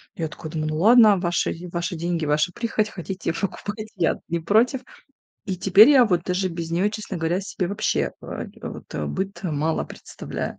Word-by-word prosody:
Я 160 -2 -2
такая 155 +1 -9
думаю: 155 -1 -2
"Ну 155 - -2
ладно, 215 0 +7
ваши 175 -1 0 0.2
ваши 175 0 -2
деньги, 170 -1 -2
ваша 150 +4 +1
прихоть, 220 -2 -1
хотите- 185 -2 -4
покупайте". 205 +3 -4
Я-то 170 -4 0
не 170 0 -1
против. 230 - +2 0.6
И 190 -3 -3
теперь 195 +6 +7
я 260 -4 +7
вот 180 -5 +1
даже 185 +1 0
без 165 -1 -5
неё, 180 +5 +2
честно 210 -3 -6
говоря, 165 +3 0
себе 190 -2 -3
вообще, 205 +2 0
э, - - -10
э, - - -5 0.2
вот - - -10 0.2
быт 195 +1 -4
мало 160 -2 -1
представляю. - - -7
185 Hz, 180 wpm, -23 LUFS, 165-210 Hz, 0.6 s, ладно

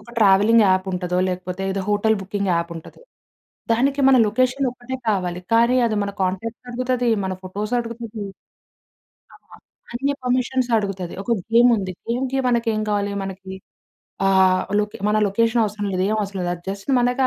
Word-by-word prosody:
ఒక 210 - -15
travelling 210 +2 +5
app 185 0 +2
ఉంటదో, 180 0 -2
లేకపోతే 180 +1 -4
ఏదో 195 0 -2
హోటల్ 210 +1 +2
బుకింగ్ 200 0 -2
యాప్ 170 0 -1
ఉంటది. 165 - -11 0.7
దానికి 270 +5 +1
మన 265 - +6
లొకేషనొక్కటే 255 +2 -1
కావాలి. 180 -4 -1
కానీ 235 +2 +4
అది 220 -2 -1
మన 200 - -2
కాంటాక్ట్స్ 220 +7 -3
అడుగుతది. 250 0 -1 0.2
మన 190 - -2
ఫోటోస్ 205 +5 -5
అడుగుతది. 230 -2 -7 1.1
ఆ! - - -14 0.6
అన్ని 270 +4 -1
పర్మిషన్స్ 255 0 0
అడుగుతది. 195 -4 -3
ఒక 235 - -1 0.2
గేమ్ 240 +1 +6
ఉంది. 190 -3 -3 0.2
గేమ్‌కి 255 +3 -1
మనకేం 230 -3 +1
కావాలి. 205 -1 0
మనకి 190 0 -8 0.7
ఆహ్, 190 -1 +4 0.2
లో‌కే 210 0 -2
మన 210 - +2
లొకేషనవసరం 215 0 0
లేదు 185 0 0
ఏమి 215 - 0
అవసరం 200 -1 -4
లేదు. 175 - -1
అది 175 - -13
జస్ట్ 195 +5 -8
మనకి 245 +2 +1
210 Hz, 155 wpm, -21 LUFS, 190-240 Hz, 1.1 s, మన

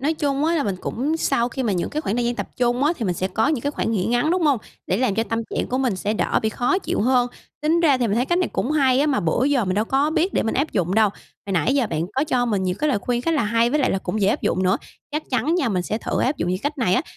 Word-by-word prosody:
Nói 300 +4 0
chung 285 -1 0
á 335 +1 +2
là 300 - +1
mình 195 -2 -2
cũng 290 +7 -2
sau 245 -6 +1
khi 260 +2 -4
mà 215 -5 0
những 175 - -2
cái 300 - -2
khoảng 235 -7 -2
thời 240 - 0
gian 240 0 0
tập - - -5
trung 245 +2 +1
á 310 - +3
thì 230 - -3
mình 180 - 0
sẽ 185 +2 -2
có 220 +8 +1
những 295 -6 0
cái 285 - 0
khoảng 260 - -2
nghỉ 185 -4 0
ngắn, 245 +7 +1
đúng 360 -1 +1
hông? 285 -6 +3 0.3
Để 185 - +1
làm 245 -4 +1
cho 225 - +1
tâm 230 0 -2
trạng - - -1
của 255 - -2
mình 250 -8 0
sẽ 205 +3 -2
đỡ - - +1
bị 220 - +1
khó 245 - 0
chịu - - -2
hơn? 245 +2 +3 0.3
Tính 325 +3 +2
ra 285 -6 +4
thì 240 - +1
mình 210 +1 0
thấy 245 - +1
cách 345 +3 +1
này 365 - +1
cũng 260 - -1
hay 270 -3 +3
á, 295 - +2
mà 280 - +1
bữa 170 +10 +1
giờ 275 -5 +2
mình 185 -1 -1
đâu 210 +2 +1
có 275 +5 +1
biết 340 +4 +1
để - - +1
mình 225 - -1
áp 285 +4 0
dụng 185 -1 0
đâu. 220 -1 +5 0.4
Hồi 195 - -3
nãy 215 +9 +2
giờ 260 -5 +2
bạn 160 -3 -2
có 270 +3 +1
cho 250 -5 +1
mình 205 -4 0
nhiều 180 -1 0
cái 305 - +1
lời 255 -8 +1
khuyên 240 +5 -2
khá 330 - 0
là 290 - +2
hay 230 +2 +2
với 300 +1 +1
lại - - +2
là 190 - 0
cũng 200 +3 -3
dễ 195 - +3
áp - - 0
dụng 185 - 0
nữa. 185 +1 +3 0.3
Chắc 300 +1 -2
chắn 260 +7 +1
nha, 275 -9 +1
mình 185 -4 0
sẽ 215 +4 -2
thử - - -2
áp 270 +3 +1
dụng 175 - -2
những 185 +1 0
cách 290 +1 -2
này 215 -8 +2
á, 255 - +2
245 Hz, 340 wpm, -22 LUFS, 210-290 Hz, 0.4 s, đâu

